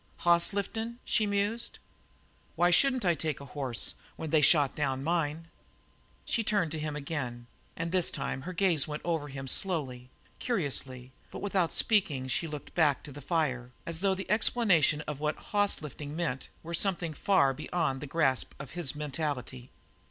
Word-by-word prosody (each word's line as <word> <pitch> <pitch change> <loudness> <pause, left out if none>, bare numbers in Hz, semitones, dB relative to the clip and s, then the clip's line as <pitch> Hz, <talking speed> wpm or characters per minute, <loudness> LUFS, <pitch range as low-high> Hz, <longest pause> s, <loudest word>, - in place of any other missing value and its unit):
"Hoss 170 +1 +4
lifting," 220 +4 -3
she 215 - +2
mused. 205 +4 -1 0.8
"Why 175 +1 +4
shouldn't 255 +4 +4
I 175 - +5
take 155 -3 -2
a 140 - -9
horse 130 -3 0 0.2
when 160 - -5
they 160 - +5
had 150 - +6
shot 145 -5 +4
down 135 -3 -1
mine?" 165 0 -1 0.8
She 230 - +1
turned 205 -7 +1
to 160 - -2
him 150 -1 -3
again, 140 -5 -4 0.3
and 165 0 -3
this 180 -2 +2
time 135 -2 -3
her 180 - -5
gaze 175 -5 +2
went 150 0 -5
over 165 -4 -1
him 135 -1 -7
slowly, 130 -7 -1 0.3
curiously, 135 - -2 0.2
but - - -8
without 190 -4 +1
speaking 155 - +2
she 165 +6 0
looked 150 -2 -7
back 150 -5 +3
to 145 - -9
the 145 +2 -9
fire, 135 -5 0 0.2
as 165 -1 -2
though 195 0 +2
explanation 195 - +3
of 150 -2 -5
what 150 0 0
"hoss 205 -5 +1
lifting" 150 0 -7
meant 155 -6 -2
were 170 +1 -6
something 170 -2 0
far 140 -4 +3
beyond 135 -1 -2
the 150 - -5
grasp 135 -3 +1
of 140 -2 -8
his 165 -6 -1
mentality. 140 -4 -4
155 Hz, 170 wpm, -30 LUFS, 140-180 Hz, 0.8 s, had